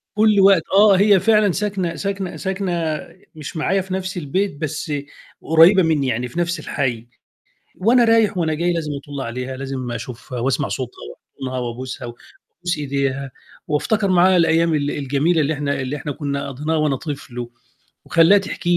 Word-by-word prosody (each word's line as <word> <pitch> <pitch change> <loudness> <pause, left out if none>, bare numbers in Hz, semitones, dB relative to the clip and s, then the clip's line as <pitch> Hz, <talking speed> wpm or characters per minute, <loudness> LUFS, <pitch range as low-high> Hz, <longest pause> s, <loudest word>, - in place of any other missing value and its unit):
كل 215 -1 +4
وقت 195 -3 +6
آه، 200 0 +6
هي 200 -1 +5
فعلًا 210 -2 +3
ساكنة 190 -3 -2
ساكنة 195 -2 -4
ساكنة 175 -5 -2 0.4
مش 155 +1 -7
معايا 190 +5 +1
في 185 0 -7
نفس 185 0 -3
البيت، 175 +3 -1
بس 155 +1 -4 0.5
قريبة 170 +4 +6
مني، 150 -5 +1
يعني 125 +1 -1
في 150 +8 -6
نفس 170 +1 -1
الحي. 120 -5 -3 0.7
وأنا 235 +5 +4
رايح 225 -4 +3
وأنا 160 -2 0
جاي 175 +3 0
لازم 160 -3 -3
أطُل 140 0 -7
عليها، 125 +2 -5
لازم 135 -2 -5
أشوفها 120 +1 -7
وأسمع 135 +3 0
صوتها 125 -2 -5
وأحضنها 130 - -7
وأبوسها 125 +1 -5
وأبوس 170 +8 -7
إيديها، 140 -1 -2 0.4
وافتكر 200 +7 0
معاها 185 +1 +5
الأيام 165 -1 +3
ال 145 -1 0
الجميلة 145 +4 0
اللي 150 +1 +1
إحنا 145 -1 -2
اللي 130 +3 -3
إحنا 145 0 -5
كنا 140 -1 -4
قضيناها 150 +4 -2
وأنا 150 -3 +1
طِفل 135 -5 -7
و 120 0 -6 0.5
وأخليها 170 +5 +5
تحكي 185 -2 -4
لي 175 - +5
155 Hz, 165 wpm, -20 LUFS, 135-185 Hz, 0.7 s, وقت